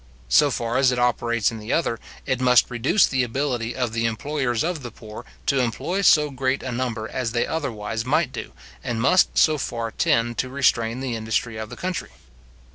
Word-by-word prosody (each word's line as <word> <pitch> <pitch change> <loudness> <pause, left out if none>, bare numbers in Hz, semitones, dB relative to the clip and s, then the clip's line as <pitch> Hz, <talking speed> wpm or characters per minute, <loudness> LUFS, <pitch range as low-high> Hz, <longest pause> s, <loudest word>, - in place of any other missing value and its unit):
So 145 - +5
far 120 -1 -2
as 135 -1 +4
it 125 - -1
operates 120 -2 +1
in 115 - -7
the 105 +2 -6
other, 115 -9 0 0.3
it 130 -1 -1
must 125 -1 +4
reduce 130 - +3
the 130 -1 0
ability 125 -1 -2
of 125 -3 -2
the 115 0 +1
employers 120 +1 -1
of 165 -2 -2
the 120 - -6
poor, 110 -2 -11 0.2
to 135 -1 +2
employ 130 - -1
so 150 -6 +5
great 130 0 -1
a 130 - -4
number 120 -3 -3
as 120 -2 -3
they 120 - +1
otherwise 115 -8 -3
might 145 +2 +1
do, - - -7 0.3
and 120 -2 -2
must 180 +10 +3
so 155 -2 +4
far 115 -3 -3
tend 115 +1 +1
to 130 - -1
restrain 125 -3 +1
the 130 -3 -2
industry 110 +1 -2
of 110 -1 -6
the - - -9
country. 185 0 -3
125 Hz, 200 wpm, -23 LUFS, 115-135 Hz, 0.3 s, So